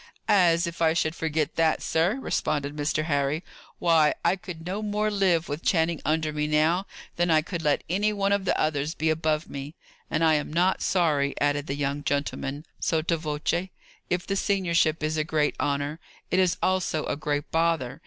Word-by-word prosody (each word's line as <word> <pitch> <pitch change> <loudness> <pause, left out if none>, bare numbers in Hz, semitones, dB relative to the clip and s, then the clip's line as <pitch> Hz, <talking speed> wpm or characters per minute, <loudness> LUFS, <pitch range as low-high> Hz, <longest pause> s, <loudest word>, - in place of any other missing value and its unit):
"As 170 -3 +4
if 170 0 -6
I 160 -1 +4
should 160 -1 0
forget 160 -2 -2
that, 160 -1 +2
sir!" 165 +7 +1
responded 145 - -1
Mr. 150 +1 0
Harry. 145 +1 0 0.3
"Why, 160 -3 +3
I - - +4
could 175 -3 -9
no 190 +4 -3
more 210 0 0
live, 185 -5 +2
with 145 +3 -4
Channing 165 -3 +1
under 155 0 0
me 150 0 -1
now, 160 +5 +2 0.3
than 175 0 +1
I 155 -1 +4
could 175 0 -4
let 150 -2 +1
any 205 +5 +1
one 200 -1 0
of 200 -1 +1
the - - +1
others 155 0 0
be 160 0 +1
above 155 0 0
me. 140 +3 -7 0.3
And 165 - 0
I 160 -1 +5
am 150 -1 -1
not 180 +4 +2
sorry," 150 -6 +1
added 145 +1 0
the 140 - -2
young 145 0 -2
gentleman, 140 +1 -2
sotto 165 +1 +1
voce. 155 +3 -2 0.4
"If 175 0 -1
the 195 - -1
seniorship 170 -6 +1
is 155 +1 0
a 155 - +2
great 155 -1 0
honour, 145 +2 -1 0.3
it 185 - +3
is 185 -2 +2
also 185 -4 0
a - - -1
great 145 0 -3
bother. 165 -5 0
160 Hz, 190 wpm, -26 LUFS, 150-175 Hz, 0.4 s, I